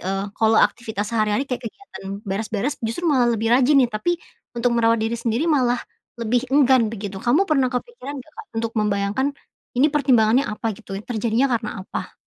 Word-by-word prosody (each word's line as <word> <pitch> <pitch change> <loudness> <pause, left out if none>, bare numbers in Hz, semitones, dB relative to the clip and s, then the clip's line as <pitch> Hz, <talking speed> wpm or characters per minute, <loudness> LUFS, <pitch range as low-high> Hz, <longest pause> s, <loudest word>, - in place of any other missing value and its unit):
eee, 195 +1 -2
kalau 220 +1 +2
aktivitas 220 -2 0
sehari-hari 215 +3 +1
kayak 250 -3 -4
kegiatan 200 - -9
beres-beres 215 +7 -2
justru 230 +10 -3
malah 260 -7 +3
lebih 225 +2 0
rajin 265 +3 +5
nih, 235 - -5
tapi 345 +12 0 0.4
untuk 240 0 +1
merawat 230 -1 +3
diri 225 - -1
sendiri 235 +5 0
malah 260 -7 +2 0.4
lebih 240 +2 0
enggan 260 -4 +4
begitu. 200 -3 -6
Kamu 255 - +3
pernah 275 -8 +2
kepikiran 280 - -5
nggak, 275 +4 -11
Kak, 430 - -15
untuk 230 0 -2
membayangkan 205 +5 0 0.5
ini 285 +4 +4
pertimbangannya 255 -2 +3
apa, 220 +1 -2
gitu 195 -2 -8
ya? 205 - -7
Terjadinya 230 +1 0
karena 215 -4 -3
apa? - - -6
235 Hz, 175 wpm, -22 LUFS, 215-265 Hz, 0.5 s, rajin